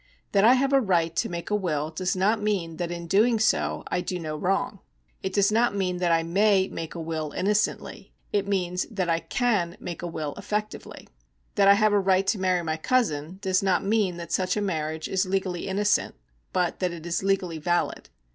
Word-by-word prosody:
That 200 -1 +3
I 240 +4 +7
have 270 +2 +1
a 270 - +5
right 170 -6 +1
to - - +1
make 170 +2 -5
a - - +3
will 155 -6 -1
does 180 +4 -1
not 210 +4 +2
mean 185 -6 -1
that 175 0 -2
in 170 0 -5
doing 220 +7 +3
so 220 - +1
I 180 - 0
do 180 0 -3
no 155 -3 -4
wrong. 185 +5 -1 0.4
It 190 - -3
does 200 +1 +3
not 230 0 +2
mean 185 -2 -1
that 175 -1 +1
I 165 0 +3
may 190 +2 +3
make 165 0 -6
a - - -5
will 160 -2 -4
innocently; 210 +2 -1 0.2
it 200 -1 +1
means 180 -2 -1
that 190 -6 -2
I 165 - +2
can 200 -7 0
make 175 - -6
a 175 - -3
will 155 -3 -4
effectively. 210 +1 -5 0.5
That 200 -1 +3
I 200 - +8
have 215 0 +3
a 205 - +4
right 190 0 +2
to 195 +1 0
marry 185 -2 +1
my 160 -1 -2
cousin 175 - 0
does 185 -1 +2
not 190 -2 +1
mean 200 -4 +1
that 170 -1 -8
such 185 +1 0
a - - +1
mar 160 -6 -1
riage 160 0 -5
is 190 0 0
legally 185 -2 -2
innocent, 205 +2 +1 0.4
but 180 -1 0
that 180 -2 0
it 170 -1 -8
is 170 0 -1
legally 190 -4 0
valid. 175 - -1
185 Hz, 215 wpm, -26 LUFS, 170-205 Hz, 0.5 s, I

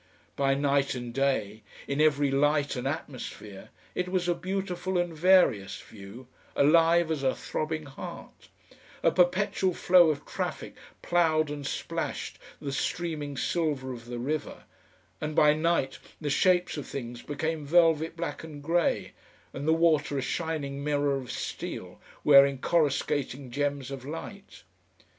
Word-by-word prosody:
By 135 -1 +2
night 140 -1 +1
and 120 -1 -6
day, 120 -6 0 0.3
in 140 +2 0
every 145 -2 +3
light 145 +1 +2
and 125 +1 -3
atmosphere, 130 - -6 0.2
it 180 0 -2
was 180 -1 0
a 175 - +3
beautiful 185 +1 -3
and 175 -2 -1
various 155 - +3
view, 105 +5 -12 0.3
alive 165 +3 +4
as 155 -3 -1
a 130 -1 +1
throbbing 155 0 -3
heart; 135 -1 -10 0.5
a - - +5
perpetual 185 0 +2
flow 175 -2 +6
of 150 -2 -2
traffic - - -4 0.3
ploughed 160 -3 +2
and 145 -2 -5
splashed - - -4 0.2
the 140 -2 -4
streaming 150 -1 -3
silver 145 -5 -1
of 115 -1 -10
the 120 0 -6
river, 145 +5 -3 0.6
and 155 0 -3
by 150 -1 +6
night 155 -3 0 0.2
the 150 -3 -2
shapes 180 0 +2
of 145 - -5
things 120 -2 -6
became 155 +2 -3
velvet 165 +1 +3
black 165 -3 -4
and 150 -3 -9
grey, 170 +2 +1 0.4
and 140 +3 -5
the - - +5
water 160 -3 +2
a - - 0
shining 145 -3 -3
mirror 145 -1 +1
of 130 -3 -5
steel, - - -6 0.2
wearing 140 -1 +7
coruscating 140 -3 0
gems 140 0 -2
of 135 -2 -6
light. 165 - -8
150 Hz, 145 wpm, -28 LUFS, 135-165 Hz, 0.6 s, wearing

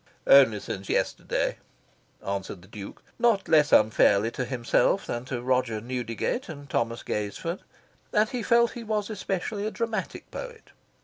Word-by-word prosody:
"Only 120 -7 +7
since 95 -1 -6
yesterday," - - 0 0.7
answered 95 -2 -4
the - - -16
Duke 100 -1 -10 0.2
(not 230 -4 +3
less 150 -2 +4
unfairly 105 0 +4
to 125 - -3
himself 125 +9 +1
than 120 +1 -4
to 125 -2 -4
Roger 125 -3 +1
Newdigate 125 - -3
and 145 -3 -8
Thomas 115 -2 -1
Gaisford). 105 - -3 0.5
And 210 0 +3
he 245 +1 -4
felt 235 +1 +4
he 240 - -7
was 215 -1 -2
especially 200 +1 -3
a - - 0
dramatic 225 0 -4
poet. 485 -2 -8
135 Hz, 145 wpm, -27 LUFS, -, 0.7 s, Only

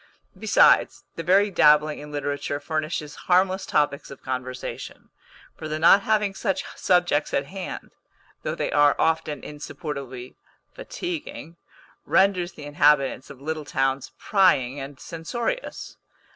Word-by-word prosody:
Besides, - - +4
the - - -4
very 195 +5 +3
dabbling 150 -2 +4
in 150 0 -10
literature 145 0 -3
furnishes 155 0 -3 0.2
harmless 185 +1 +3
topics 145 -1 0
of 140 - -12
conversation; 130 0 -6 0.4
for 155 - -7
the 155 0 -3
not 170 +5 +6
having 210 -1 +1
such 195 -1 -2
subjects 175 -5 +1
at 140 - 0
hand, 190 +4 -7 0.5
though - - -3
they - - -2
are 145 -1 +4
often 160 -2 0
insupportably 140 -4 -7 0.4
fatiguing, 340 - -6 0.5
renders 190 -2 +2
the 145 - -10
inhabitants 145 -3 +2
of 135 - -12
little 155 0 -3
towns 135 -1 -1
prying 145 -10 +2
and 135 0 -8
censorious. 235 - -5
155 Hz, 125 wpm, -24 LUFS, 145-185 Hz, 0.5 s, not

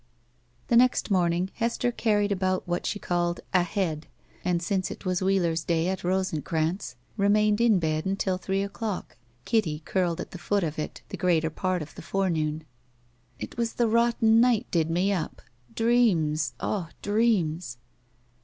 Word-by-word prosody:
The 235 - +3
next 245 -2 +4
morning 180 0 +1
Hester 235 +1 0
carried 210 -3 +1
about 185 -1 0
what 175 0 -1
she - - -1
called 175 -2 -1
"a 180 - +5
head," 170 -3 -2 0.4
and, 180 -1 +1
since 185 +2 -1
it - - -9
was 185 0 0
Wheeler's 175 -4 +1
day 165 +1 +1
at 190 0 -3
Rosencranz, 165 -5 -1 0.2
remained 210 +1 +3
in 230 -4 +5
bed 155 -1 -1
until 190 -1 -1
three 195 +2 -1
o'clock, 200 0 -4 0.3
Kitty 160 -9 0
curled 180 -3 0
at - - -6
the 180 - -8
foot 200 +2 0
of 155 -2 -3
it 150 - -5
the - - -5
greater 165 -3 +2
part 185 0 -1
of 150 - -12
the - - -10
forenoon. 160 -4 -1 0.7
"It - - -8
was 230 -1 -1
the 235 - +1
rotten 230 0 +4
night 245 -2 +3
did 165 -2 +1
me 180 +4 +1
up. 170 -5 -4 0.3
Dreams! 170 - +2
Ugh! 180 -6 -2
dreams!" 185 - +1
185 Hz, 160 wpm, -27 LUFS, 165-205 Hz, 0.7 s, a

